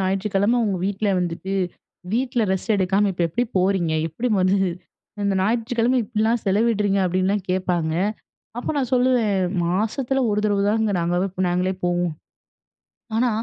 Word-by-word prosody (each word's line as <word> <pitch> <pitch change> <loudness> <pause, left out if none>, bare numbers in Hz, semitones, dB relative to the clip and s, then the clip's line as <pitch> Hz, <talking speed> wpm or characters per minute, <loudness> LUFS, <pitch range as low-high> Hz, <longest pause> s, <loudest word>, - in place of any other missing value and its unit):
ஞாயிற்றுக்கிழம 195 +4 +1
உங்க 195 -3 -1
வீட்டில 205 +1 -1
வந்துட்டு, 180 +2 -3 0.6
வீட்டில 245 +1 0
ரெஸ்ட் 190 +4 0
எடுக்காம, 195 +2 +2
இப்போ 175 -1 -1
எப்டி 240 +10 0
போறீங்க? 185 -3 +1 0.2
எப்படி 225 +11 -3
வந்து, 185 +2 +3 0.7
இந்த 200 -1 +1
ஞாயிற்றுக்கிழம 235 +4 +1
இப்டிலா 220 +1 0
செலவிடுறீங்க. 205 0 +2
அப்டின்லா 185 +3 +1
கேப்பாங்க. 175 -4 0 0.6
அப்போ, 245 - -4
நான் 260 -3 -1
சொல்லுவேன் 245 -6 +2 0.2
மாசத்துல 225 +9 0
ஒரு 210 0 +1
தடவ 205 -1 +1
தாங்க 220 0 +1
நாங்கவே 175 +3 0 0.2
நாங்களே 180 +2 0
போவோ. 175 0 +1 1.1
ஆனா, 245 +2 +2
200 Hz, 130 wpm, -22 LUFS, 185-230 Hz, 1.1 s, வந்து